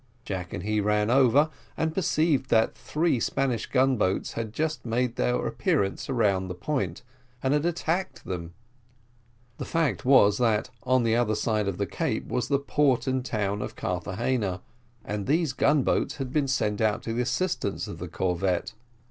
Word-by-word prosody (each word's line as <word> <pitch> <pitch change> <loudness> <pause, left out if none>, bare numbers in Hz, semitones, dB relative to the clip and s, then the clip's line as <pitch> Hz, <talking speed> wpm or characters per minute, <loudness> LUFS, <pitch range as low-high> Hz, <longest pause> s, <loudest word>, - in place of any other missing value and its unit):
Jack 90 -3 -4
and 85 - -5
he 105 +1 0
ran 105 +2 +1
over, 135 +4 +4 0.3
and 160 0 0
perceived 155 -6 +1
that 110 0 +3
three 155 -4 0
Spanish 125 -1 -1
gun 130 -1 +2
boats 95 -2 0
had 115 -2 -4
just 155 +6 -2
made 120 +1 -1
their - - +1
appearance 95 +5 0
round 100 -7 +1
the 90 - -4
point, 100 - -2 0.4
and 130 +1 +2
had 150 +3 +2
attacked 175 +2 -2
them. 85 -2 -5 1.1
The - - -3
fact 165 -5 0
was, 115 -6 +5
that 115 -1 +1
on 130 +1 +2
the 115 -1 +2
other 115 -3 +2
side 105 -1 0
of 95 -3 -2
the 100 - 0
cape 85 - -2
was 125 - -1
the 140 - +2
port 140 -2 +1
and 130 -1 0
town 105 -4 -2
of - - -5
Carthagena, 95 +2 -2 0.4
and 105 -1 -3
these 155 -1 +2
gun 145 +1 +3
boats - - 0
had 135 -2 -5
been 150 -3 +2
sent 105 -6 0
out 110 -1 +1
to 115 - -3
the 120 - 0
assistance 120 - -1
of 80 - -7
the 90 - -5
corvette. 90 +1 -1
115 Hz, 175 wpm, -27 LUFS, 100-135 Hz, 1.1 s, was